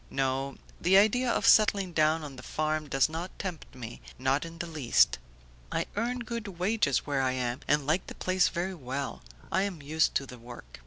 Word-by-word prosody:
"No, 135 0 -1 0.3
the 185 +3 +5
idea 240 +5 +4
of - - +1
settling 200 -4 +5
down 155 0 +3
on 145 -2 -7
the 130 - -9
farm 155 +2 -2
does 135 -1 +3
not 165 +3 -6
tempt 180 -8 -6
me, 120 -2 -8 0.2
not 135 +4 +1
in 165 0 -9
theleast. 155 -7 +2 0.5
I - - 0
earn 240 +4 -1
good 235 -2 -5
wages 180 - +1
where 140 -2 0
I 130 -1 +1
am 125 -1 -2
and 145 0 +2
like 155 +6 +1
the - - -8
place 185 0 +2
very 185 +2 -2
well; 135 -3 -5 0.3
I 190 - +2
am 195 -4 -2
used 155 +2 +1
to 140 - +1
the 125 -2 -11
work." 115 - -11
155 Hz, 195 wpm, -29 LUFS, 135-185 Hz, 0.5 s, the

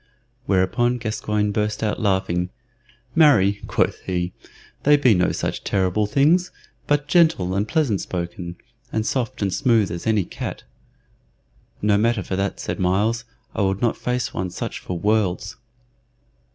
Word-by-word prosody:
Whereupon 105 +6 +2
Gascoyne 105 -2 -1
burst 105 +1 -1
out 105 - -1
laughing. 95 -3 0 0.6
"Marry!" 105 - +4
quoth - - 0
he, 90 -1 -1 0.5
"they 145 +1 +5
be 130 -5 +5
no 90 -1 +2
such - - -3
terrible 95 +2 +1
things, 160 - +3 0.4
but 145 -1 +1
gentle 160 - +3
and 100 +2 0
pleasant 145 - +1
spoken, 85 -1 -5 0.4
and 110 0 -1
soft 120 -4 -2
and 95 -2 0
smooth 115 -8 +2
as 85 +4 -5
any 105 -4 +2
cat." - - -6 1.2
"No 105 -1 +3
matter 115 -2 +1
for 95 - -3
that," 100 +1 -2
said - - -4
Myles; 105 +6 +1 0.3
"I - - -2
would 95 +2 0
not 120 - +2
face 125 0 -2
one 95 0 -2
such 90 - -5
for 90 - -5
worlds." 105 -1 0
105 Hz, 145 wpm, -22 LUFS, 95-120 Hz, 1.2 s, they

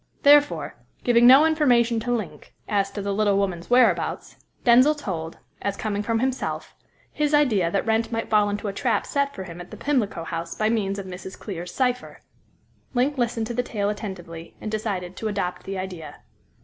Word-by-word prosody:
Therefore, 290 0 +4 0.3
giving 240 0 +5
no 270 +5 +8
information 245 -7 +3
to 245 +2 -3
Link 180 -11 -4
as 200 -2 +1
to 205 - -6
the 200 0 -1
little 205 -1 +2
woman's 185 -4 -2
whereabouts, 250 +1 +2 0.3
Denzil 255 +5 +6
told 165 - -5 0.2
as 200 0 -2
coming 205 -2 -2
from 225 +2 0
himself 260 +2 -2 0.4
his 300 0 +1
idea 220 -13 +3
that 195 - -1
Wrent 225 0 +1
might 225 0 -2
fall 210 -1 +3
into 205 +1 -3
a 200 - -3
trap 235 +3 0
set 280 0 -1
for 190 - -5
him 175 -1 -9
in 175 - -11
the - - -10
Pimlico 225 - -1
House 165 0 -5
by 215 0 +1
means 205 -3 0
of 200 - -5
Mrs. 185 0 -8
Clear's 180 -4 -6
cypher. 250 -1 -1 0.8
Link 265 +3 +1
listened 235 -2 0
to 240 - -4
the 245 - +1
tale 205 -4 -2
attentively, 175 -6 -7
and 215 - -5
decided 195 -5 -3
to 220 - -3
adopt 195 -4 -3
the 195 0 -4
idea. 180 -6 -6
215 Hz, 190 wpm, -24 LUFS, 190-245 Hz, 0.8 s, no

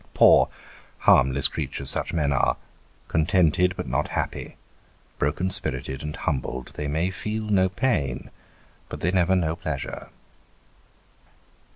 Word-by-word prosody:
Poor, - - +6 0.5
harmless 65 +1 +4
creatures 70 0 +1
such - - -1
men 75 -4 0
are; - - +1 0.5
contented 90 +2 +2
but - - -4
not 65 +5 -1
happy; - - -4 0.6
broken 85 +6 0
spirited 65 -7 -1
and 75 +1 -5
humbled, 65 -1 -3
they 75 - -4
may 80 +6 0
feel 110 +3 -3
no 100 -3 +2
pain, 85 - -1 0.6
but - - -7
they 90 - +1
never 95 0 +2
know 80 -3 0
pleasure. 70 -7 -5
80 Hz, 125 wpm, -24 LUFS, 70-95 Hz, 0.6 s, Poor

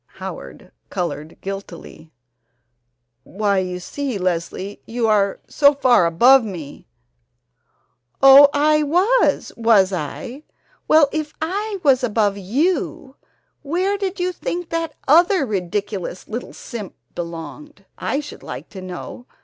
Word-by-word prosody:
Howard - - -9 0.2
colored 170 -4 -4
guiltily: 180 -5 -8 1.1
"Why, 200 - -1
you 180 -1 -3
see, 265 +5 -4
Leslie, 185 +2 -3
you 230 0 -1
are 200 -2 +2
so 285 -1 +4
far 245 -10 +4
above 245 +11 +5
me 170 -9 -8 0.6
" - - -51 0.7
"Oh, 275 +1 +9
I 305 +1 +3
was, 365 +12 +2
was 215 -5 +3
I? 240 - -5 0.5
Well, 310 -2 +6
if 310 -1 -4
I 400 +6 -3
was 265 -3 +4
above 210 -4 +1
you, 265 - -2 0.5
where 360 +7 -1
did 395 -1 -4
you 360 +1 0
think 350 -1 -5
that 330 -2 -3
other 340 +2 +4
ridiculous 200 -2 -4
little 235 +3 -6
simp 215 -6 -8 0.2
belonged, 175 - -8
I 280 - -1
should 290 - -11
like - - -8
to 190 - -9
know? 185 +6 -8
240 Hz, 125 wpm, -20 LUFS, 190-300 Hz, 1.1 s, Oh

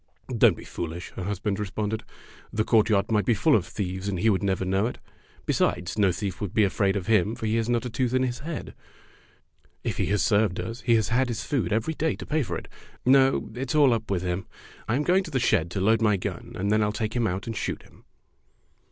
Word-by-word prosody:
'' - - -36
"Don't - - +5
be - - -10
foolish," 85 +1 -6
her 95 - -6
husband 100 +1 -2
re 105 - -1
sponded. 105 +2 -2 0.5
"The 110 - 0
courtyard 110 -2 +3
might 105 -2 +3
be 115 - +2
full 145 +8 +4
of 95 - +1
thieves, 95 -1 -4
and 100 -2 -1
he 110 +5 +3
would 95 - +1
never 95 -2 0
know 95 +4 +1
it. - - -6 0.5
Be - - +1
sides, 90 +1 0
no 100 -3 +3
thief 90 0 -4
would 100 -4 -4
be 110 - +5
afraid 100 0 +1
of 95 -3 -2
him, 105 +1 +2
for - - -5
he 110 +1 +1
has 115 0 -1
not 120 0 +1
a - - -2
tooth 125 +1 0
in 130 - +3
his 125 -1 -2
head. 160 +2 -6 1.1
If - - -2
he - - 0
has 105 0 +1
served 105 -4 +2
us, 115 +1 -5
he 120 -1 +3
has 110 -4 +1
had 130 +2 +2
his 120 0 -3
food 120 - -1
every 110 +9 0
day 160 0 0
to - - -8
pay 155 +1 0
for 90 - -2
it. - - -9 0.4
No, 135 +1 +4
it's 125 +4 -3
all 140 -5 +6
up 115 -1 -3
with 95 -3 0
him. 90 +1 -2 0.4
I 110 - +1
am 145 - +1
going 185 +4 +3
to - - -7
the 135 -4 0
shed 100 -8 +2
to 95 - -3
load 110 +4 +3
my 105 -3 +3
gun, 90 - -5
and 100 +2 -1
then 110 0 +3
I'll 105 0 +1
take 110 +2 -3
him 120 -2 +2
out 95 0 -3
and 115 - -4
shoot - - -3
him." - - -21
110 Hz, 255 wpm, -26 LUFS, 95-120 Hz, 1.1 s, all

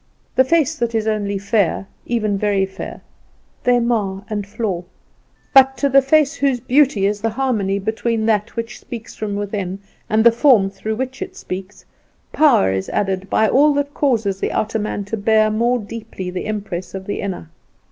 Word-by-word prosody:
The 260 - +6
face 320 +1 +2
that 235 -1 -1
is 220 -1 0
only 205 -2 -1
fair, 200 -1 0 0.2
even 215 -4 0
very 200 -1 +1
fair, 190 0 -8 0.6
they 245 0 +4
mar 205 -5 -1
and 205 -2 -3
flaw; 200 -4 -3 0.7
but 270 -1 +6
to 280 +3 +1
the 275 +1 +6
face 290 +2 +3
whose 275 -5 0
beauty 250 -5 +3
is 205 0 0
the 225 - +1
harmony 220 -5 0
between 220 +2 -1
that 220 0 0
which 230 -1 -5
speaks 230 -2 -8
from 210 -2 -4
within 200 -2 -3 0.3
and 220 +1 +3
the 235 - +7
form 230 -5 +4
through 215 +3 -4
which 260 +3 -4
it - - -5
speaks, 190 +2 -7 0.5
power 275 - +4
is 95 0 -2
added 195 -1 -1
by 220 - +3
all 290 +5 +4
that 285 0 -1
causes 220 -9 0
the - - -1
outer 220 +1 -1
man 205 -1 -3
to 225 +3 -3
bear 215 +1 +3
more 235 +3 +2
deeply 210 -4 -7
the 185 - -4
impress 195 -4 -4
of 190 0 -6
the 205 - -3
inner. 180 - -5
215 Hz, 180 wpm, -19 LUFS, 200-245 Hz, 0.7 s, the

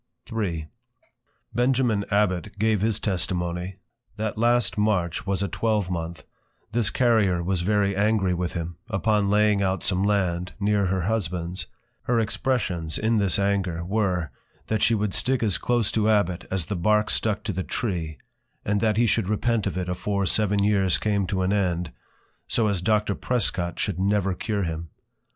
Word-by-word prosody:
III. 85 -8 -2 0.9
Benjamin 120 -4 +2
Abbot 100 -4 0
gave 110 -1 +2
his 110 0 +1
Testimony, 90 -1 -1 0.4
That 110 0 -2
last 120 0 +2
March 100 -6 0
was 100 0 0
a - - 0
twelvemonth, 90 -5 -2 0.5
this 115 -2 +1
Carrier 105 -8 +2
was 90 0 0
very 100 +1 +1
angry 100 -2 +2
with 90 0 -2
him, 85 -1 -4
upon 105 0 +1
laying 105 0 +3
out 95 -1 0
some 95 -1 +1
Land, 95 -3 0
near 100 -1 +2
her 95 0 0
Husband's: 90 -3 -2 0.4
Her 120 -1 +2
Expressions 105 -8 -1
in 110 0 +1
this 100 -4 +2
Anger, 95 -4 0
were, 90 - 0 0.4
_That 110 -2 0
she 115 - +4
would 105 -2 -1
stick 130 -2 +1
as 105 -5 +1
close 120 -3 +1
to 110 -1 +1
+Abbot+ 95 -4 +1
as 95 -3 -1
the 100 - -3
Bark 105 +4 +2
stuck 110 -1 -1
to 105 - -2
the 95 - -2
Tree; 85 -10 -3 0.5
and 105 0 +1
that 110 -2 +2
he 120 - +4
should 115 -3 +1
repent 110 0 +1
of 95 - -3
it 90 -1 -2
afore 100 +2 -1
seven 105 +1 +1
Years 100 -3 +3
came 100 -3 0
to 95 0 -1
an 95 +2 +1
End, 90 -5 0 0.6
so 115 -2 +1
as 100 -4 -1
Doctor 105 +1 +2
+Prescot+ 95 -7 -1
should 95 -3 -2
never 100 -1 +1
cure 100 +2 -2
him. 85 -1 -4
100 Hz, 165 wpm, -25 LUFS, 90-110 Hz, 0.9 s, she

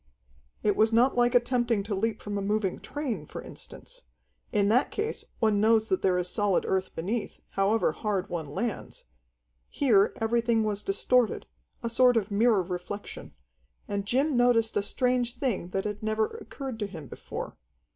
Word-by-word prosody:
It 205 -2 +2
was 220 +1 +3
not 240 +4 +4
like 245 0 +3
attempting 240 -3 +2
to 205 +1 -4
leap 220 +3 -1
from 205 0 -4
a 200 - -1
moving 205 -1 -1
train, 240 - -4
for - - -7
instance. - - -11 0.5
In 200 -1 +2
that 245 +5 +3
case 435 +2 -3
one 215 -3 +2
knows 220 0 +3
that 190 - +1
there 185 -1 +2
is 180 0 -1
solid 205 0 +1
earth 190 -1 -1
beneath, 205 +8 -3
however 200 +3 +2
hard 200 -3 -2
one 165 -5 -4
lands. 200 +10 -4 0.7
Here 220 -8 +3
everything 230 0 +2
was 210 -1 -2
distorted, 225 +4 +1 0.4
a 230 - -1
sort 250 0 +5
of 210 -1 -1
mirror 210 -1 +3
reflection. 180 +3 -7 0.5
And 200 -1 -2
Jim 270 +5 +2
noticed 240 -2 +3
a - - +3
strange 250 +2 0
thing 230 -10 -1
that 195 +1 -2
had 210 0 -4
never 215 0 +1
occurred 270 - -7
to 205 - -2
him 165 -7 -9
before. - - -7
215 Hz, 165 wpm, -28 LUFS, 200-240 Hz, 0.7 s, sort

